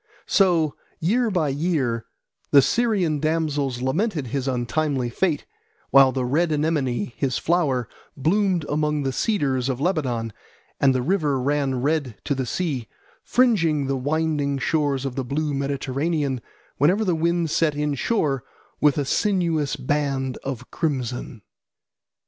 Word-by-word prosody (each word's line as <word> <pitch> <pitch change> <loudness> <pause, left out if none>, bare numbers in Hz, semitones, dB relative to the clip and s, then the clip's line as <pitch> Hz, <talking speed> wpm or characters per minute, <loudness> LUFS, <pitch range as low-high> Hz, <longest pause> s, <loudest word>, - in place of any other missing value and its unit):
So 170 -6 +3 0.3
year 225 +8 +2
by 170 -7 +1
year 135 -6 -1 0.4
the 140 -2 +7
Syrian 200 - +1
damsels 145 -5 -1
lamented 160 - 0
his 140 -1 -1
untimely 130 0 -1
fate, 160 +2 0 0.5
while 135 -1 +7
the 130 -1 -1
red 160 +6 +1
anemone, 145 -7 0
his 135 -3 -1
flower, 145 -9 +1 0.3
bloomed 180 +3 +1
among 150 0 0
the 135 -1 -1
cedars 135 - 0
of 130 -1 -2
Lebanon, 130 - -1 0.5
and 135 -2 +4
the 125 - 0
river 150 -4 +1
ran 135 -1 0
red 145 -6 0
to 145 - 0
the 130 -2 -2
sea, 140 -10 -2 0.4
fringing 170 - +2
the 135 0 0
winding 145 0 0
shores 140 -1 0
of 135 - -2
the 135 - -2
blue 145 +4 -2
Mediterranean, 140 0 -1 0.4
whenever 185 +10 +3
the 180 - +2
wind 170 0 0
set 155 -2 +2
inshore, 150 - 0 0.4
with 150 -1 +3
a 145 - 0
sinuous 165 -5 +1
band 135 -1 -1
of 125 -2 -6
crimson. 125 -7 -3
145 Hz, 135 wpm, -23 LUFS, 130-165 Hz, 0.5 s, the